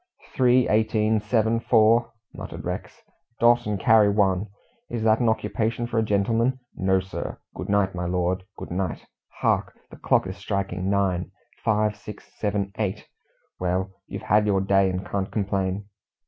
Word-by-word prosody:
"Three, 125 -1 +4
eighteen, 110 0 +2
seven, 110 +1 +1
four," 115 0 +4 0.2
muttered - - -8
Rex; - - -6 0.4
"dot 120 -1 +4
and 105 -2 -1
carry 110 +1 +5
one. 100 -1 +2 0.4
Is 115 -2 -3
that 110 0 +4
an 120 -2 +3
occupation 110 +2 -1
for 120 -1 -1
a - - +2
gentleman? 115 +5 +1 0.2
No, 95 0 +2
sir. 95 0 -6 0.2
Good - - -7
night, 100 -2 +2
my 90 -1 -3
lord, 90 +1 0
good - - -8
night. 90 -1 -3 0.4
Hark! - - +1
The - - -11
clock - - +2
is - - -6
striking 95 -1 -2
nine; 95 -3 0 0.3
five, 105 -1 +1
six, 105 0 -11
seven, 100 -2 -1
eight! 105 0 -3 0.5
Well, 90 +1 -1 0.2
you've - - -7
had 105 +1 +3
your 100 -2 +2
day, 95 0 +3
and 95 +1 -3
can't 95 -1 -3
complain." 100 -1 -1
105 Hz, 160 wpm, -25 LUFS, 95-110 Hz, 0.5 s, carry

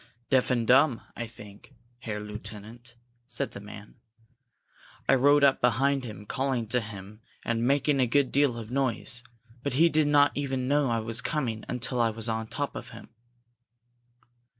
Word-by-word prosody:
"Deaf 130 -2 +3
and 120 -3 +1
dumb, 130 0 +4
I 115 - -4
think, 105 -3 -14 0.2
Herr 110 -4 -5
Lieutenant," 105 +3 -9 0.3
said - - -3
the - - -8
man. 105 0 -12 1.1
"I - - +5
rode 145 +2 +5
up 140 -1 +4
behind 130 +3 +2
him, 105 -3 -8
calling 130 0 -1
to 125 - +2
him 105 -1 -9 0.2
and 115 +1 0
making 140 +1 +2
a 125 - +3
good 140 +2 +2
deal 140 -4 +2
of 115 0 -8
noise, 125 -2 -1 0.4
but 140 0 -2
he 165 +6 +5
did 155 -1 +2
not 145 -1 +5
even 135 -2 -2
know 145 -1 +2
I 115 - +1
was 115 +1 -1
coming 125 -8 -2
until 125 0 0
I 115 - +3
was 110 +1 -2
on 110 0 -2
top 145 +5 -4
of - - -7
him." - - -12
125 Hz, 170 wpm, -28 LUFS, 110-140 Hz, 1.1 s, I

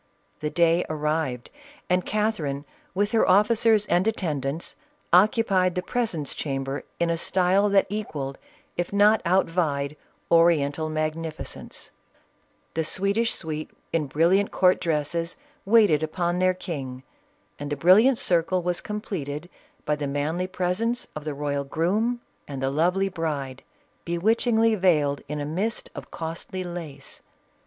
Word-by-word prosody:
The 150 - -2
day 170 +1 +3
arrived, 150 -5 -2 0.4
and 180 0 +2
Catherine, 190 -10 -1 0.3
with 205 +2 +1
her 225 - +3
officers 210 +2 +4
and 180 +2 +2
attendants, 155 - -2 0.4
occupied 190 -1 +4
the 180 - -1
presence 180 - -1
chamber 135 -1 -3 0.2
in 170 0 +2
a 165 - -1
style 190 +4 +2
that 200 -1 +4
equalled, 155 -10 -4 0.4
if 175 - -2
not 205 +2 +5
outvied, 165 -5 +1 0.4
Oriental 160 -2 +3
magnificence; 155 +1 -5 0.8
the 160 - 0
Swedish 200 +7 +1
suite 155 -2 -5 0.2
in 155 -4 0
splendid 175 +7 +3
court 185 0 +3
dresses, 165 +1 -1 0.3
waited 205 -8 +5
upon 175 +2 -1
their 185 0 +3
king, 135 -8 -6 0.6
and 145 0 -5
the - - +1
brilliant 215 - +6
circle 175 -1 +1
was 175 0 -1
completed 175 -6 -5 0.3
by 150 - +1
the 145 -1 -3
manly 155 +6 -1
presence 190 +6 -1
of 155 -1 -6
the 150 -2 -3
royal 140 -1 -2
groom 210 - 0 0.3
and 140 -2 -6
the 135 0 0
lovely 180 +6 +2
bride, 145 -7 -3 0.4
bewitchingly 225 +6 +2
veiled 155 -8 +2
in 150 +1 -4
a 145 - -3
mist 190 +10 -3
of - - -9
costly 165 +3 -5
lace. 165 -6 -8
170 Hz, 130 wpm, -25 LUFS, 150-195 Hz, 0.8 s, brilliant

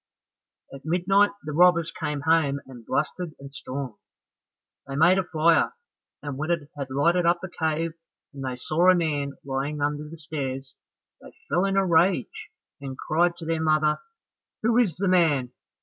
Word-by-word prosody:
At 135 - -10
midnight 185 +5 +3
the 150 - -5
robbers 170 +1 +4
came 150 -2 -4
home 155 -3 +2
and 125 -3 -12
blustered 155 +6 -2
and 140 0 -11
stormed. 130 -4 -6 0.9
They 135 - -5
made 170 +6 +5
a - - +1
fire, 165 - +2 0.5
and 145 -2 -5
when 155 +3 -3
it 155 -4 -1
had 140 -2 -5
lighted 170 +6 +2
up 175 0 +3
the 185 -1 -8
cave 160 0 -1 0.4
and 135 -1 -7
they 130 -1 -3
saw 155 +8 +2
a 185 - +7
man 145 -5 -1
lying 140 +2 -2
under 150 +1 -2
the 165 - -10
stairs, 135 -4 -5 0.5
they - - -14 0.2
fell 175 +6 +2
in 195 0 0
a 195 - +3
rage 170 -4 +1 0.3
and 135 -2 -6
cried 175 +2 +1
to 165 - -8
their 165 0 -1
mother, 155 -1 +2 0.6
"Who 230 +1 +2
is 200 -10 +2
the 195 +3 -1
man? 155 -9 +3
155 Hz, 170 wpm, -25 LUFS, 140-175 Hz, 0.9 s, a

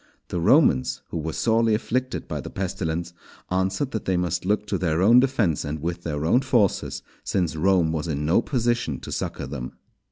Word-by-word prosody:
The 90 - -2
Romans, 65 -5 +3
who - - -4
were 80 +1 -3
sorely 115 +3 +2
afflicted 130 +3 -2
by - - -4
the - - -7
pestilence, 85 -3 -3 0.4
answered 95 +8 0
that 110 - -4
they 95 -1 +1
must 90 0 -1
look 105 +2 +1
to - - -2
their 80 -3 0
own 115 +7 +7
defence, 120 - +1
and 75 +2 -4
with 85 +3 -3
their 75 -2 -3
own 120 +10 +4
forces, 120 -7 +1 0.2
since 90 -5 -1
Rome 90 0 +3
was 80 0 -2
in 75 -2 -2
no 85 +8 +3
position 120 - -1
to - - -8
succour - - -3
them. 65 -2 -6
90 Hz, 190 wpm, -24 LUFS, 80-110 Hz, 0.4 s, own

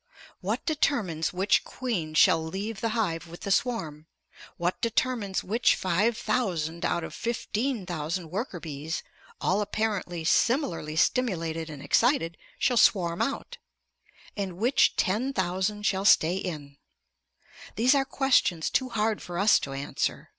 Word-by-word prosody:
What - - -3
determines 235 - 0
which 190 +3 +2
queen 185 -12 -4
shall 160 +1 +5
leave 200 +6 -5
the 230 - 0
hive 170 -6 -1
with 170 +1 -11
the 200 - -3
swarm? 180 -9 -1 0.5
What 175 +1 -1
determines 230 -4 0
which 230 +5 +2
five 200 +6 +1
thousand 170 -11 -1
out 170 - 0
of - - -7
fifteen 235 -1 -2
thousand 165 0 -4
worker 195 -1 -3
bees, 155 +1 -5 0.4
all 205 - +1
apparently 205 -5 -2
similarly 170 - +1
stimulated 165 -6 0
and 145 -3 -8
excited, 230 - +2 0.2
shall 250 -2 +1
swarm 175 -5 +3
out, 485 +12 -3 0.8
and 190 -4 -4
which 240 +6 +3
ten 235 +9 0
thousand 190 +1 -1
shall 195 -1 +1
stay 175 -4 +5
in? 150 -7 -6 1.0
These 245 +6 +4
are 275 -1 +3
questions 260 - +1
too 260 -1 +1
hard 220 -2 0
for 175 -1 -6
us 205 +3 +5
to 135 - -5
answer. 135 +1 -3
190 Hz, 140 wpm, -27 LUFS, 165-230 Hz, 1.0 s, shall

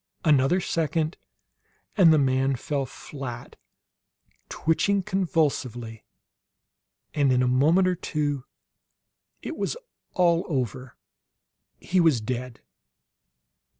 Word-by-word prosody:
Another 145 +3 +4
second 160 -1 -1 0.8
and 180 -6 +6
the 155 - +5
man 135 -1 +2
fell 140 +1 -3
flat, 125 -3 -8 0.9
twitching 195 +5 +1
convulsively; 135 - -1 1.1
and 145 -3 +2
in 125 0 +3
a - - +2
moment 155 +9 +3
or 185 - +2
two 145 -5 -2 1.0
it - - -5
was - - -3 0.4
all 170 -2 +3
over. 130 -3 -3 0.8
He 185 - 0
was 160 -8 +4
dead! 125 +2 -5
145 Hz, 95 wpm, -25 LUFS, 130-165 Hz, 1.1 s, and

